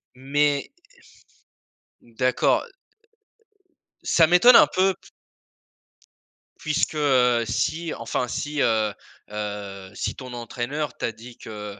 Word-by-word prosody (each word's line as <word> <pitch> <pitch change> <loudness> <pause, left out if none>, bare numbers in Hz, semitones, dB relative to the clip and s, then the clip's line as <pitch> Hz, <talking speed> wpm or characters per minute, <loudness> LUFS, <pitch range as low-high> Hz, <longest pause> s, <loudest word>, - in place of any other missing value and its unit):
Mais 140 +2 0 1.3
N 115 - -23
d'accord. 130 0 +2 1.4
Ça 165 -2 +4
m'étonne 180 +9 +7
un - - +8
peu 190 +1 +2
p - - -21 1.5
puisque, 155 +1 -1
heu 125 -5 +3
si, 160 +9 -2
enfin 115 +2 -3
si, 150 +4 -4
heu 110 -3 +1 0.4
heu, 100 -2 -6
si - - -3
ton 130 -2 -9
entraîneur 120 +4 -4
t'a 115 - -3
dit 115 +2 -13
que, 105 -2 -9
125 Hz, 105 wpm, -24 LUFS, 110-150 Hz, 1.5 s, un